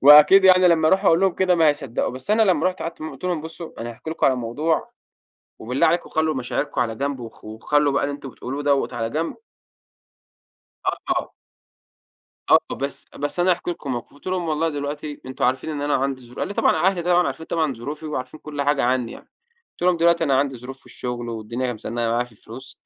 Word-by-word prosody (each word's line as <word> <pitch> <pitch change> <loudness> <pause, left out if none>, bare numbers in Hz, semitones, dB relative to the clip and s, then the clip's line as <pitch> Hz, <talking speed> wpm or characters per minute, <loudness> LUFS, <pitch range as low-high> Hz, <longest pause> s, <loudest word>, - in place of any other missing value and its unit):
وأكيد 150 +7 +9
يعني 185 -1 +7
لمّا 160 -2 +4
أروح 190 +4 +3
أقول 165 -1 +5
لهم 190 -2 +3
كده 185 -1 +3
ما 165 -2 +5
هيصدقوا. 135 -5 -1
بس 130 +10 -7
أنا 220 +1 +5
لمّا 185 -5 +3
رحت 185 0 -2
قعدت 165 0 -6
معاهم 155 -1 -5
قلت 135 - -12
لهم: 175 -4 0
"بصوا 165 -2 -8
أنا 120 +1 -4
هاحكي 140 +7 -8
لكم 165 - +1
على 130 - +4
موضوع 145 +7 -1 0.7
وبالله 125 +7 +1
عليكم 170 +2 0
خلوا 160 -1 0
مشاعركم 130 +1 -2
على 115 -2 -1
جنب 140 +1 -2
وخ 115 -2 -10
وخلوا 140 +7 +1
بقى - - +1
اللي 145 - -1
أنتم 140 -2 -9
بتقولوه 135 +4 -6
دوّة 140 -1 +2
على 115 -1 -2
جنب." 160 +5 -2 1.5
آه، - - +1
آه. - - 0 1.2
آه، - - +9 0.2
"بس، 140 0 -4
بس 145 +5 -2
أنا 185 - +4
هاحكي 175 0 0
لكم 140 -6 -4
موقف." 120 +2 -6
قلت 145 - -20
لهم: 185 -3 -1
"والله 160 +1 +1
دلوقتي 145 0 -5
أنتم 130 - -3
عارفين 130 +5 0
إن 145 -2 -3
أنا 145 0 +1
عندي 135 0 0
ظروف" 125 0 -14
قال 200 - -2
طبعًا 185 - +2
أهلي 190 -3 +2
طبعًا 175 0 +3
عارفين 160 - -5
طبعًا 155 -5 0
ظروفي 145 +7 -6
وعارفين 130 0 -5
كل 145 -2 -4
حاجة 145 0 +2
عنّي 125 -2 0
يعني. - - -13 0.4
قلت - - -13
لهم: 180 -1 +4
"دلوقتي 170 0 +3
أنا 135 -3 +3
عندي 135 -2 0
ظروف 130 +3 -9
في - - -23
الشغل، 120 -1 -5
والدنيا 115 +3 -3
أهي 120 - -2
مزنقة 115 +2 -3
معايا 120 +2 +1
في 125 - -18
الفلوس، 105 - -12
145 Hz, 220 wpm, -23 LUFS, 125-165 Hz, 1.5 s, وأكيد